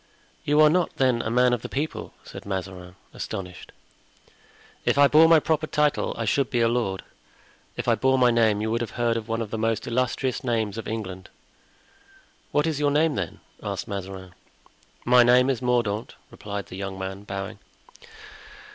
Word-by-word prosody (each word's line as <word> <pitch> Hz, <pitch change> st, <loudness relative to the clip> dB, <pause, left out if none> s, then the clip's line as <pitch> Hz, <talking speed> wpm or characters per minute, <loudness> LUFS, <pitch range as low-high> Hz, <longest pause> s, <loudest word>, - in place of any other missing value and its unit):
"You 150 Hz, +1 st, +2 dB
are 155 Hz, -, +7 dB
not, 180 Hz, +1 st, +1 dB
then, 130 Hz, -3 st, +2 dB
a 110 Hz, -, -3 dB
man 125 Hz, +1 st, +3 dB
of 120 Hz, -, -1 dB
the -, -, -7 dB
people?" 150 Hz, +3 st, -4 dB
said -, -, -10 dB
Mazarin, 95 Hz, -2 st, -6 dB, 0.2 s
astonished. 90 Hz, -2 st, -7 dB, 1.1 s
"If -, -, +1 dB
I 140 Hz, 0 st, +7 dB
bore 160 Hz, +3 st, +6 dB
my 165 Hz, -1 st, +7 dB
proper 155 Hz, 0 st, 0 dB
title 150 Hz, -1 st, 0 dB
I 115 Hz, -, -2 dB
should 130 Hz, +3 st, +1 dB
be 120 Hz, -, 0 dB
a 115 Hz, -, +4 dB
lord. 115 Hz, -5 st, -1 dB, 0.7 s
If -, -, -4 dB
I 120 Hz, -, +5 dB
bore 130 Hz, +4 st, +2 dB
my 125 Hz, -1 st, +4 dB
name 110 Hz, -3 st, +2 dB
you 110 Hz, +1 st, -1 dB
would 115 Hz, +1 st, 0 dB
have 120 Hz, -, -5 dB
heard 115 Hz, -2 st, 0 dB
one 115 Hz, 0 st, -1 dB
of 105 Hz, -, -9 dB
the 110 Hz, -, -3 dB
most 110 Hz, -1 st, 0 dB
illustrious 125 Hz, +1 st, -1 dB
names 115 Hz, -4 st, -1 dB
of 115 Hz, -, -7 dB
England." 95 Hz, -4 st, -5 dB, 1.2 s
"What 150 Hz, -, +2 dB
is 155 Hz, -3 st, -1 dB
your 145 Hz, -1 st, +2 dB
name, 150 Hz, +2 st, +2 dB
then?" 90 Hz, -5 st, -4 dB, 0.2 s
asked -, -, -4 dB
Mazarin. 95 Hz, -2 st, -7 dB, 0.7 s
"My 125 Hz, 0 st, +6 dB
name 125 Hz, +2 st, +5 dB
is 125 Hz, -2 st, -3 dB
Mordaunt," 120 Hz, -4 st, -1 dB, 0.2 s
replied 100 Hz, -1 st, -6 dB
the 95 Hz, -, -10 dB
young 95 Hz, -1 st, -5 dB
man, 95 Hz, +1 st, -5 dB
bowing. 95 Hz, -1 st, -6 dB
115 Hz, 180 wpm, -25 LUFS, 100-130 Hz, 1.2 s, are